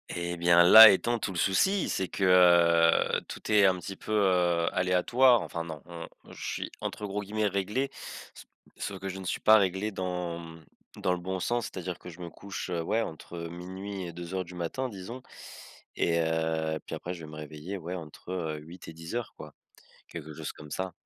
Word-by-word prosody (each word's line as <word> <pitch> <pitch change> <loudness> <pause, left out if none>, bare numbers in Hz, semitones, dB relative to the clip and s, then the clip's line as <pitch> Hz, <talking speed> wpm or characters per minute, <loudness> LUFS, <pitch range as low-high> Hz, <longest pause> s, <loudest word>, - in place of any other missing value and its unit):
Et 85 0 -3
bien, 85 0 +5
là 110 +5 +11
étant 120 +4 +1
tout 100 - -3
le 90 - -6
souci! 190 - +2
C'est 95 - -1
que, 85 -3 +4
tout - - -7
est 105 -2 +6
un 95 - +2
petit 95 +2 -7
peu, - - -9
heu, 90 -5 +2
aléatoire, 115 +7 +4
enfin, 85 - -5
non, 80 -3 -8
on 85 -1 -8 0.2
je - - -10
suis - - -4
entre 105 - -4
gros 105 +1 -3
guillemets, 105 +1 -2
«réglé», 105 +8 -1 0.4
s - - -12 0.3
sauf 100 -1 -5
que 95 - -6
je 95 0 -5
ne 95 - -7
suis - - -2
pas 110 0 +7
réglé 95 +2 0
dans, 90 -3 -3
mmh, 80 -1 -12 0.3
dans 90 - 0
le 90 - -3
bon 95 +1 -4
sens, 120 +6 -1
c'est-à-dire 90 -1 -6
que 90 - -10
je 90 +2 -12
me 85 - -6
couche, 100 -2 -7
heu, 85 -1 -1
ouais, 110 +7 0
entre 85 0 -8
12:00 95 +3 -7
et - - -7
02:00, 90 +6 -4
disons 110 +5 -8 0.8
et 85 0 +1
heu, 80 -1 -1
puis - - -4
après 90 - -5
je 85 -3 -9
vais 75 - -11
me - - -9
réveiller, 75 +5 -7
ouais, 90 0 -6
entre, 85 +1 -9
heu, 80 -4 -3
8 85 +4 -12
et 80 - -8
10:00 85 +9 -5
quoi. - - -10 0.6
Quelque 80 -2 -8
chose - - -6
comme 75 -1 -13
ça, 95 -1 -3
90 Hz, 200 wpm, -29 LUFS, 85-100 Hz, 0.8 s, là